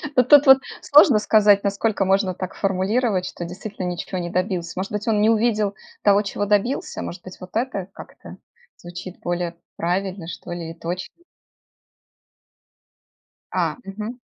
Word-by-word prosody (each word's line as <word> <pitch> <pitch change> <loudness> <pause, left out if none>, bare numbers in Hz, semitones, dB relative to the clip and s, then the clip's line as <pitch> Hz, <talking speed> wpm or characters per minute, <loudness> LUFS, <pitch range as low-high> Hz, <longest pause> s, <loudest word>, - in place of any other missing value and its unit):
Ну, 250 - +6
тут 290 +3 +7
вот 265 0 +9 0.2
сложно 280 -6 +6
сказать, 210 -2 +4
насколько 200 0 0
можно 190 -1 +2
так 185 +1 -6
формулировать, 195 +1 0
что 175 - -6
действительно 190 +2 -7
ниче 180 +1 -4
не 175 0 -4
добился. 180 -2 -2
Может 195 - -4
быть, 210 +2 -4
он 210 -2 +2
не 220 - +4
увидел 215 -3 +1 0.3
того, 205 0 +5
чего 205 0 -3
добился? 210 +6 0
Может 175 +1 -7
быть, 185 - -11
вот 180 +2 -12
э 225 -6 -2
как-то - - -12 0.4
звучит 175 +1 -9
более 175 -1 -3 0.2
правильно, 180 0 -2
что 175 - -8
ли, 170 -1 -5
и - - -8
точно? 175 +2 -6 2.4
А, - - -1
мгм. 215 +5 -7
195 Hz, 150 wpm, -22 LUFS, 180-215 Hz, 2.4 s, вот